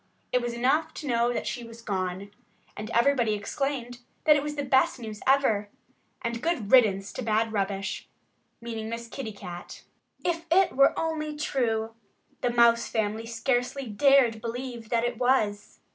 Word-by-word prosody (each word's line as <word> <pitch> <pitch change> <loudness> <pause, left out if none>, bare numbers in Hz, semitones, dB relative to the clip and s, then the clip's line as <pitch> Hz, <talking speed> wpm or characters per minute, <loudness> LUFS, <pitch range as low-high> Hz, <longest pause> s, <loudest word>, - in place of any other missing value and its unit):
It 250 - +2
was 240 -1 -3
enough 305 +7 +1
to - - -7
know 235 -1 +2
that 245 - -3
she 245 - -4
was 230 0 -12
gone. 190 -1 -3 0.4
And 215 +1 -6
everybody 235 -3 +3
exclaimed 245 +3 -3 0.2
that 300 - +6
it 290 - +1
was 295 +1 -4
the 285 - -2
best 265 -1 +3
news 215 -3 -7
ever 225 -7 +3 0.5
and 235 0 -3
good 250 -11 -1
riddance 200 -6 +4
to - - -5
bad 220 -1 0
rubbish 195 -1 -2 0.5
meaning 225 -2 -5
Miss 230 0 -5
Kitty 230 -2 -6
Cat. 180 -4 -9 0.4
If 335 -1 -1
it 380 +2 +4
were 275 +1 +5
only 310 -2 -2
true! 225 -6 -1 0.5
The 245 - +1
Mouse 235 -1 +4
family 220 +1 -2
scarcely 245 +3 -1
dared 240 0 +4
believe 235 -1 -5
that 230 -1 +1
it 240 -1 -2
was. 215 -5 +1
235 Hz, 160 wpm, -27 LUFS, 220-265 Hz, 0.5 s, that